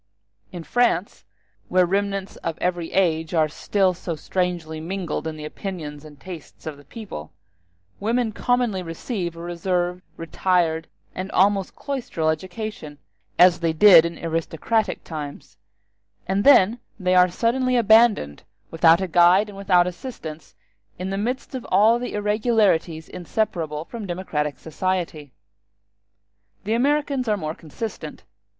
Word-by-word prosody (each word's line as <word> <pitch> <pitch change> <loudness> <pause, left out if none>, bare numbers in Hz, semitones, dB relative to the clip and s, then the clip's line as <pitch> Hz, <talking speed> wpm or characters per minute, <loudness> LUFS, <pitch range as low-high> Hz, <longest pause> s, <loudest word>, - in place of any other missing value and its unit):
In 175 -2 -7
France, 210 -4 0 0.4
where 185 0 +4
remnants 195 +1 -2
of 165 -1 -4
every 175 -2 -2
age 165 -3 +1
are 155 -1 +3
still 190 +4 0
so 170 -1 -5
strangely 170 -1 -2
mingled 170 -1 -4
in 155 -1 -5
the 150 - -7
opinions 150 -4 -6
and 150 -2 -14
tastes 180 -3 -11
of 155 -2 -5
the 145 - -16
people, 140 - -9 0.7
women 230 +2 0
commonly 240 -3 0
receive 175 +1 -4
a 165 - -9
reserved, 175 +1 -2 0.2
retired, 165 -1 0 0.3
and 185 +1 -5
almost 195 0 +2
cloistral 245 - -2
education, 175 -2 -6 0.4
as 180 -1 +6
they 165 -1 0
did 170 -1 +8
in 170 0 -4
aristocratic 165 +6 -1
times; 150 -8 -8 0.7
and 195 +2 +1
then 235 -4 +6 0.2
they 185 -1 +1
are 180 0 +6
suddenly 250 +6 +1
abandoned, 220 - +4 0.3
without 165 +2 +5
a 190 - -1
guide 180 +4 +5
and 205 - -10
without 180 -3 +4
assistance, 180 - -8 0.4
in 185 +1 -4
the - - -1
midst 245 +8 -3
of 255 -2 -4
all 225 +3 +4
the 245 - -5
irregularities 210 -6 +1
inseparable 165 -5 -3
from 225 -1 -7
democratic 155 -5 -3
society. 160 -3 -3 1.3
The 215 - -1
Americans 275 +1 +1
are 210 -1 +1
more 155 -4 -4
consistent. 160 - -7
180 Hz, 135 wpm, -23 LUFS, 160-210 Hz, 1.3 s, did